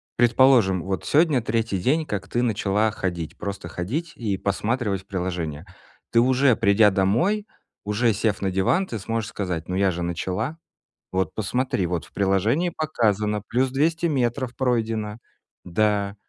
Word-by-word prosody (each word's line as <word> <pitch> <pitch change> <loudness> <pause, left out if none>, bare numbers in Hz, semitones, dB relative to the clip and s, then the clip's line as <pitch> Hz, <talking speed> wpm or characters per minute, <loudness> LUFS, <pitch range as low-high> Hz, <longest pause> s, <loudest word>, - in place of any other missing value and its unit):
предположим, 120 -7 +4
вот 95 -3 -3
сегодня 150 -4 +3
3 115 -3 -1
день, 150 - +1
как 100 -8 -4
ты 120 - -1
начала 110 -2 +1
ходить, 85 -5 -4
просто 100 -3 -5
ходить 140 - -3
и 105 -5 -1
посматривать 105 0 -1
в - - -39
приложение. 90 -5 -3 0.5
Ты 115 - +4
уже, 130 0 +4
придя 100 +1 +5
домой, 120 - +1 0.4
уже 110 +3 +2
сев 105 -1 -1
на 95 -1 0
диван, 130 - +2
ты 115 - -4
сможешь 115 +2 -3
сказать: 90 -7 -4
"Ну 90 - -1
я 95 0 +2
же 90 0 -4
начала! 95 - -3 0.5
Вот, 95 0 -1
посмотри, 110 -3 -1
вот 85 -1 -3
в - - -22
приложении 105 - +1
показано, 110 - 0
плюс 130 +2 0
200 160 +5 +1
метров 130 -4 0
пройдено! 115 -4 -1 0.5
Да. 100 +2 0
105 Hz, 150 wpm, -24 LUFS, 95-125 Hz, 0.5 s, придя